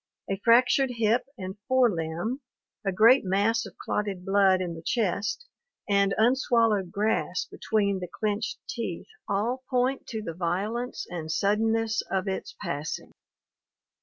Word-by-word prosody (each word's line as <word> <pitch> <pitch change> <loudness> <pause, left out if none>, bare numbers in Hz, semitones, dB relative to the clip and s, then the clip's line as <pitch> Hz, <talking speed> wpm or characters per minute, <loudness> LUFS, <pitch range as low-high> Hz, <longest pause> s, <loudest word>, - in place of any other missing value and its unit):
A 195 - -1
fractured 250 +3 +5
hip 230 +2 +2
and 190 +1 -6
fore 255 -3 +4
limb, 170 - -3 0.4
a 195 - 0
great 225 +7 +6
mass 205 +4 +1
of - - -15
clotted 200 -3 -3
blood 195 -1 +4
in 180 -2 -3
the 165 - -8
chest, 210 - -1 0.4
and 200 -1 +3
unswallowed 230 -5 +3
grass 210 -3 0
between 200 -3 0
the 180 - -5
clenched 215 0 -2
teeth - - -4 0.2
all 230 +6 -1
point 255 +1 0
to 220 -3 -4
the 165 - -4
violence 195 +9 -2
and 160 -3 -5
suddenness 220 +4 +1
of 190 0 -1
its 190 - -4
passing. 150 +2 -4
210 Hz, 135 wpm, -27 LUFS, 190-230 Hz, 0.4 s, great